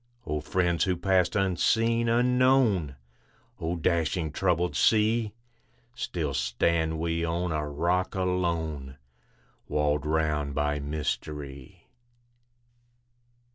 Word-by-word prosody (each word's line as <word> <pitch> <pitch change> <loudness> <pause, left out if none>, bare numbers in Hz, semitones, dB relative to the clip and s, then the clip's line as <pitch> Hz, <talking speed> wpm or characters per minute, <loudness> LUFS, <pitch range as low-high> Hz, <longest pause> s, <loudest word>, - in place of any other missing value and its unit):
O 75 -1 -2
friends 85 0 +1
who 90 -2 0
passed 95 0 +2
unseen, 115 +4 +2
unknown! 125 - +3 0.6
O 85 +2 -2
dashing, 85 -1 0
troubled 90 +1 0
sea! 110 0 +3 0.6
Still 85 - -3
stand 80 +6 0
we 85 +1 -1
on 85 +1 -1
a 75 -1 -2
rock 90 +6 0
alone, 85 -7 -2 0.7
Walled 75 0 0
round 75 -2 0
by 75 0 0
mystery. 70 -2 -5
85 Hz, 95 wpm, -27 LUFS, 75-95 Hz, 0.7 s, unknown